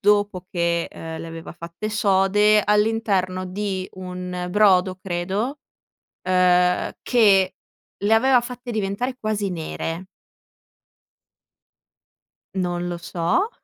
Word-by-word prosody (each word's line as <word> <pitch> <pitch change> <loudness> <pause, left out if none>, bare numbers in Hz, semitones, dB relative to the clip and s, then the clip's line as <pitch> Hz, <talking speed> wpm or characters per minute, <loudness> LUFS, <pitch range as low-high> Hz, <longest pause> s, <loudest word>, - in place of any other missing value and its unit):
dopo 205 -3 +2
che, 170 -1 0
uhm, 160 0 -7
le - - -7
aveva 165 0 -8
fatte 170 +5 -6
sode 205 0 +3
all'interno 210 -3 +1
di 190 0 -3
un 180 -1 -5
brodo, 185 -2 +4
credo, 195 +9 -2 0.7
uhm, 180 -1 +3
che 195 -6 +4 0.5
le 210 +2 +3
aveva 250 +2 +5
fatte 245 0 -7
diventare 220 +5 -2
quasi 210 -2 -1
nere. 165 +1 -4 2.5
Non 175 -1 -1
lo 175 - -3
so, 175 - 0
190 Hz, 100 wpm, -23 LUFS, 180-210 Hz, 2.5 s, aveva